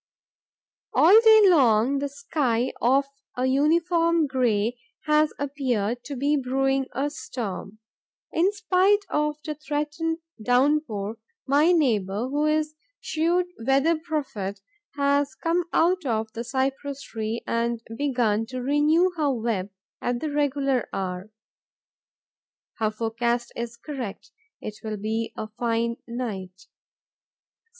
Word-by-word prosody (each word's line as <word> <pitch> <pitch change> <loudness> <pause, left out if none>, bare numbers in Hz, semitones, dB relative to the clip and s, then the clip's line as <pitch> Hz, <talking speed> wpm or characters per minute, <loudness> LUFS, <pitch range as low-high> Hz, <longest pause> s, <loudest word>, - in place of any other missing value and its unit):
All 385 +7 +8
day 440 -1 +7
long, 270 - +4
the 285 0 -2
sky, 275 -4 -1
of 270 +4 +3 0.3
a 250 - +1
uniform 330 +4 +3
grey, 245 -4 0 0.3
has 300 0 +3
appeared 245 -5 -1
to 285 - -5
be 285 +3 +1
brewing 270 0 0
a 275 +4 -2
storm. 215 -7 -6 0.6
In 355 +5 +3
spite 410 -1 +2
of 300 0 0
the 305 - -2
threatened 300 +2 -2 0.2
downpour, 245 -4 +1 0.3
my 295 +5 +4
neighbour, 225 - +1
who 295 +2 +1
is 305 0 +1
a - - -39 0.3
shrewd 340 +3 +1 0.2
weather 275 +6 +3
prophet, 280 - -4 0.4
has 280 -1 +1
come 335 +3 0
out 360 +2 +2
of 220 -4 -2
the 230 0 -4
cypress 270 +2 -2
tree 220 +1 -4
and 230 0 -1
begun 235 -5 0
to 255 +2 -5
renew 300 +7 +3
her 295 -3 +2
web 225 -6 -2 0.3
at 245 0 -1
the 310 +2 -3
regular 280 -3 0
hour. 185 +1 -4 1.5
Her 220 -1 +2
forecast 235 +2 -2
is 235 0 -5
correct: 245 -6 -7 0.3
it 210 0 -7
will 215 -1 -4
be 220 +2 -2
a 215 - -4
fine 235 0 0
night. 195 -6 -5
270 Hz, 125 wpm, -25 LUFS, 230-300 Hz, 1.5 s, All